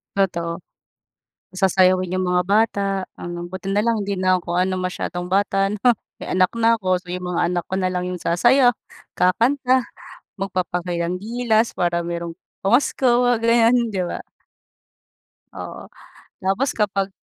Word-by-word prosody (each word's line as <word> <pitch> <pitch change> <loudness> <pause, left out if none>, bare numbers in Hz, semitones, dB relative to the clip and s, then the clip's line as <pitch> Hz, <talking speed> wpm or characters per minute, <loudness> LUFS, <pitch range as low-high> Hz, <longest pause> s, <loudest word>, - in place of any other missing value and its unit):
Totoo. 170 -3 -1 0.9
Pasasayawin 185 -1 +2
yung 185 0 0
mga 180 0 +2
bata, 210 0 +2 0.4
ang, 175 0 -5
um, - - -5
buti 190 +1 -7
na 205 +1 +2
lang 230 -1 +1
hindi 200 0 -2
na 185 0 +2
ako 175 0 -4
ano 185 +1 +1
masyadong 180 -1 -4
bata 195 +1 +1
'no. 210 +1 -4 0.4
May - - -5
anak 185 -1 +3
na 230 0 +3
ako, 185 -2 0
so 180 - -25
yung 180 0 -4
mga 175 -1 -1
anak 175 -1 -1
ko 190 - -3
na 185 -1 0
lang 180 0 -2
yung 180 -1 -5
sasayaw, 245 +9 +4 0.5
kakanta, 250 +7 +2 0.6
magpapakitang 180 -2 -2
gilas, 230 +1 0
para 170 -1 0
merong 170 0 -5 0.3
pamasko 240 +7 +2 0.2
mga 245 -1 +3
ganyan 230 +1 +4 0.2
'di 190 - -1
ba? - - -4 1.4
Oo, - - -8 0.5
tapos 195 +9 0
kapag 200 -2 -1
185 Hz, 150 wpm, -21 LUFS, 180-220 Hz, 1.4 s, sasayaw